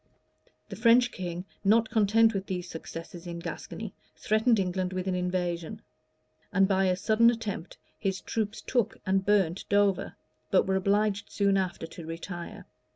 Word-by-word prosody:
The 195 - -6
French 235 +3 +5
king, 175 -1 -5 0.2
not 220 +2 +3
content 220 +1 +4
with 195 -1 -3
these 180 -1 -3
successes 165 +1 -8
in 170 0 -5
Gascony, 170 - -6 0.2
threatened 220 +2 +2
England 185 -1 -1
with 185 0 -2
an 190 - 0
invasion; 180 +1 -2 0.7
and, 195 -2 +4
by 195 -1 +2
a 185 -1 +2
sudden 220 +4 +4
attempt, 220 -7 -4 0.2
his 195 -2 -1
troops 220 -1 -3
took 240 -5 0
and 190 0 +2
burnt 195 -3 +2
Dover,[] 200 -2 +2 0.3
but 190 - +4
were 190 - +1
obliged 205 +1 +1
soon 200 -1 +2
after 185 -3 -1
to 165 0 -10
retire. 170 +1 -7
195 Hz, 155 wpm, -28 LUFS, 180-215 Hz, 0.7 s, French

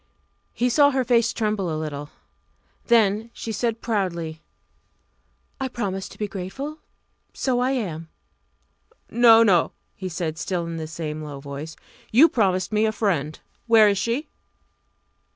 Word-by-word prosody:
He 245 - 0
saw 285 +3 +5
her 265 -2 0
face 235 -2 +3
tremble 210 -4 -1
a 155 - -2
little. 150 -2 -5 0.8
Then 220 -1 +3
she 225 - -6
said 230 +1 -2
proudly 170 -7 -2 1.2
"I 265 - -1
promised 195 -6 -4
to - - -16
be 210 - -2
grateful. 210 - -6 0.6
So 255 -2 0
I 250 +1 +1
am." 170 -11 -3 1.0
"No, 230 -1 +7
no!" 185 -6 +3 0.2
he 185 -1 -5
said, 160 -2 -4
still 175 +2 -2
in 165 0 -5
the 160 -1 -5
same 155 -1 -5
low 145 -2 -7
tone. 140 +2 -7 0.4
"You 270 +9 +7
promised 185 -5 +1
me 215 +1 +3
a - - +1
friend. 165 -9 -1 0.3
Where 225 -2 +7
is 200 -1 0
she?" 235 +9 -1
200 Hz, 145 wpm, -24 LUFS, 165-235 Hz, 1.2 s, No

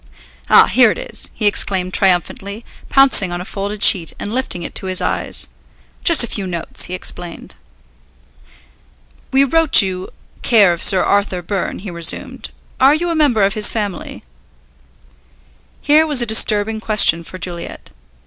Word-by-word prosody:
"Ah, - - +6
here - - +4
it - - -3
is!" - - -7
he 215 - -4
exclaimed 190 -3 -1
triumphantly, 195 +3 -1 0.2
pouncing 270 -9 +3
on 175 - -5
a 180 - -8
folded 200 +1 -6
sheet 170 -4 +3
and 205 - -6
lifting 245 -9 -3
it - - -8
to 190 - -7
his 185 -1 -2
eyes. - - -3 0.6
"Just 335 -7 +6
a - - -4
few 200 -3 -4
notes," 170 -2 -1
he 180 - -6
explained. 175 -1 -7 1.8
"We 270 +1 +3
wrote 320 -3 +3
you 185 -1 -5 0.3
care 205 -7 +3
of 170 - -8
Sir 190 - +3
Arthur 200 -3 -1
Byrne," 195 +1 -4
he 195 -1 -9
resumed; 170 -1 -2 0.3
"are 270 +3 +4
you 345 +2 -3
a - - -2
member 275 -9 +1
of 195 0 +1
his 215 -1 +2
family?" 205 -5 -6 1.6
Here 310 +2 +3
was 295 -4 +1
a 240 - +3
disturbing 220 -1 +1
question 210 -6 +3
for 185 - -11
Juliet. 175 -1 -7
200 Hz, 160 wpm, -16 LUFS, 185-235 Hz, 1.8 s, Ah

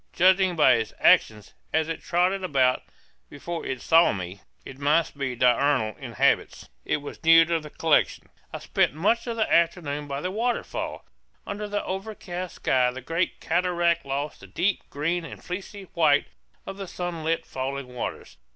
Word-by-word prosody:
Judging 185 0 +4
by 150 -5 +5
its 110 -2 -4
actions, 105 -2 +3 0.2
as 160 0 +1
it 165 - -4
trotted 185 +2 +1
about 130 -7 +2 0.5
before 165 +4 -6
it 130 - -4
saw 165 +1 +5
me, 95 0 -6 0.2
it 135 - -10
must 150 +3 +2
be 135 -3 -3
diurnal 125 -2 +2
in - - -8
habits. - - +1
It 145 - -1
was 145 - -9
new 165 0 +7
to 165 0 0
the 150 -1 -10
collection. 160 0 +1 0.2
I - - -5
spent - - 0
much 225 +9 +1
of 235 - -2
the 220 -1 0
afternoon 150 -4 +1
by 140 0 -4
the 185 - -3
waterfall. 235 +4 -3 0.4
Under 210 +1 -5
the 205 0 -3
overcast 185 -2 -5
sky 125 -1 +2
the 130 +1 -7
great 165 +7 -2
cataract 170 -1 +1
lost 140 +2 -4
the - - -13
deep 190 +3 -1
green 165 +5 -1
and - - -10
fleecy 195 +2 -6
white 150 -3 +3 0.4
of 195 - -7
the 195 -1 -6
sunlit 165 -2 -3
falling 135 +1 -4
waters. 125 - -6
165 Hz, 170 wpm, -25 LUFS, 140-180 Hz, 0.5 s, new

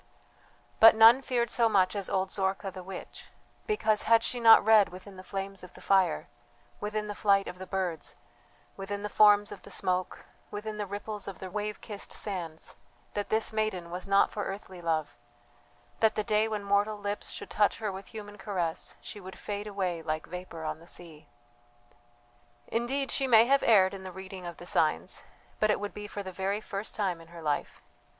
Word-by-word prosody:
But 225 0 +9
none 225 +4 +8
feared 240 -3 0
so 230 -2 +3
much 190 -2 +3
as 200 -2 -3
old 190 0 0
Zorka 195 0 -1
the 185 - -8
witch 185 0 -9 0.4
because 220 - +2
had 230 0 +6
she 245 - -1
not 225 -3 +8
read 215 -2 +6
within 185 +2 -11
the 185 - -10
flames 195 0 -5
of 180 - -12
the - - -12
fire, 190 -2 +2 0.5
within 210 +1 -2
the 210 - -4
flight 200 -1 +3
of 180 - -7
the 190 - -7
birds, 185 -4 -3 0.6
within 200 +1 -5
the 210 - -3
forms 205 -1 +6
of - - -8
the - - -12
smoke, 185 -1 -1 0.2
within 210 +1 -5
the 205 - -2
ripples 205 +1 -5
of 195 - -6
the 185 -1 -8
wave 210 +1 -3
kissed 205 -3 -6
sands, 170 -6 -4 0.4
that 205 -1 -3
this 220 0 +1
maiden 205 -6 -1
was 180 +2 -6
not 195 0 +4
for 205 - -3
earthly 190 -2 -7
love, 160 -3 -1 0.8
that 220 -1 +3
the 215 - 0
day 215 +1 +2
when 215 -2 -3
mortal 200 +1 +1
lips 205 0 -3
should - - -7
touch 205 -1 +2
her 215 -2 -2
with 190 +1 -8
human 205 -1 -9
caress 175 -6 -3
she 210 - -8
would 190 -1 -10
fade 205 0 -5
away 185 -5 -2
like 155 0 -3
vapour 180 -2 -8
on 155 0 -3
the 170 - -16
sea! 165 -4 -7 1.4
Indeed 265 - -1
she 270 - 0
may 225 -2 +7
have 275 +2 +4
erred 195 -5 +5
in 195 - -7
the 190 -1 -7
reading 190 -1 -8
of 170 - -7
the 175 - -10
signs, - - +1 0.4
but 215 - +3
it 210 - +2
would 205 0 -5
be 210 0 -7
for 205 -1 -6
the 190 - -6
very 195 +3 -1
first 205 -1 -5
time 185 -5 -1
in 165 - -15
her 170 -1 -11
life. 150 -2 -2
200 Hz, 200 wpm, -29 LUFS, 185-215 Hz, 1.4 s, But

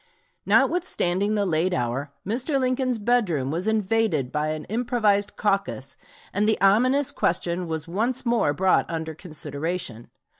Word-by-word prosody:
Notwithstanding 205 - +2
the 205 -1 +1
late 175 +1 +1
hour, 130 +4 -2
Mr. 255 - 0
Lincoln's 255 -1 0
bedroom 205 - +1
was 175 +6 -2
invaded 215 - +1
by 150 0 -1
an 155 0 -3
improvised 220 -3 0
caucus, 195 -10 -1 0.4
and 205 +2 +1
the 220 - +2
ominous 250 +9 +3
question 175 +1 0
was 160 -1 -4
once 230 +9 -1
more 235 -10 +2
brought 185 +5 +2
under 160 -1 -4
consideration. 155 -5 -5
195 Hz, 135 wpm, -24 LUFS, 160-225 Hz, 0.4 s, ominous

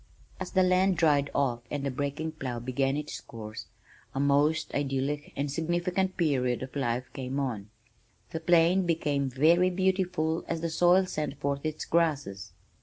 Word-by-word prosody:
As - - -4
the 190 -1 +4
land 185 0 +3
dried 145 -4 +3
off 130 -4 +1
and 145 -2 -3
the 140 - 0
breaking 145 +4 -3
plow 130 -6 -5
began 135 +3 0
its 150 0 -5
course, 110 -1 -8 0.5
a - - -1
most 145 +3 +2
idyllic 140 +1 -2
and 140 0 -2
significant 175 +4 -1
period 130 -7 +1
of 130 - -9
life 125 -2 -1
came 130 +1 -3
on. 115 -7 -3 0.6
The 160 - -3
plain 175 +2 +4
became 145 -5 0
very 165 +8 +4
beautiful 180 -3 0
as 165 -1 -2
the 165 -1 -2
soil 175 +3 +4
sent 150 -5 -4
forth 140 +2 -1
its 155 0 -4
grasses. 145 - 0
145 Hz, 160 wpm, -28 LUFS, 135-170 Hz, 0.6 s, the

